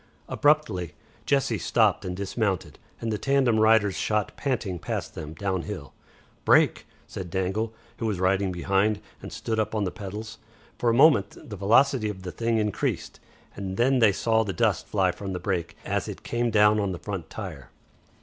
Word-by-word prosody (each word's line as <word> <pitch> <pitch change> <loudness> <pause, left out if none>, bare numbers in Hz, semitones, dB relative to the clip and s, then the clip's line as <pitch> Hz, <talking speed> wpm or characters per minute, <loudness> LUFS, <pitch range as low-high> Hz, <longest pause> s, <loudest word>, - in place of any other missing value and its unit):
Abruptly 110 - +1 0.3
Jessie 140 -2 +1
stopped - - +2
and 90 0 -4
dismounted, 100 -1 -2 0.2
and 115 - -3
the 105 - -2
tandem 135 -5 +2
riders 110 -3 +4
shot 105 -2 -1
panting 115 -10 -2
past - - -4
them 75 +1 -7
downhill. 95 -5 -4 0.5
"Brake," - - +4 0.2
said 90 -2 -7
Dangle, 95 +5 -1 0.3
who 115 - -2
was 100 -4 -1
riding 95 +1 +2
behind, 100 +4 +1 0.2
and - - -8
stood 110 -1 -3
up 110 0 -1
on 105 - +1
the 95 - -1
pedals. 105 +2 -7 0.4
For 120 - +2
a - - +3
moment 135 -7 +5
the 105 - -6
velocity 110 +4 +3
of 95 -3 -7
the 90 - -5
thing 115 +2 0
increased, 105 -2 -2 0.4
and 95 -1 -5
then 130 +2 +3
they 110 -3 +6
saw 110 +3 +2
the 100 -3 -3
dust 110 -6 +1
fly 95 -3 +2
from 95 +1 -6
the 90 - -3
brake, 85 -2 -3
as - - -1
it - - -7
came 120 0 0
down 105 -1 +4
on 100 -2 -1
the - - -5
front 95 -2 -6
tire. 80 - -7
105 Hz, 180 wpm, -26 LUFS, 95-115 Hz, 0.5 s, they